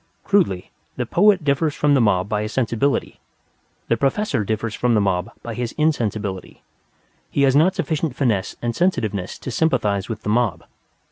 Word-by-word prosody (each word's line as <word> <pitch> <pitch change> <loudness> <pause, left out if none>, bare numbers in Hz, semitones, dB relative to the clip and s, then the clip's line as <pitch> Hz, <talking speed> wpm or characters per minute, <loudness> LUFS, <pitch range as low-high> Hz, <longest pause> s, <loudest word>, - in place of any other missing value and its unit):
Crudely, 170 - +1 0.2
the - - -2
poet 195 -1 +3
differs 145 +1 +1
from 145 -1 +2
the 135 - +4
mob 100 -4 +2
by 105 0 -1
his 105 +1 -4
sensibility; 130 +2 0 0.7
the 115 - +2
professor 135 - 0
differs 110 +2 -2
from 120 +2 +1
the - - +4
mob 95 0 0
by 120 - -5
his 120 0 -4
insensibility. 110 -11 -2 0.7
He 140 - +1
has 135 -1 +4
not 165 +6 +4
sufficient 155 -4 -2
finesse 110 -9 0
and 120 -1 -1
sensitiveness 105 - -1
to 130 - -6
sympathize 115 - 0
with 110 -1 -5
the - - -3
mob. 115 -3 +1
120 Hz, 165 wpm, -21 LUFS, 105-145 Hz, 0.7 s, the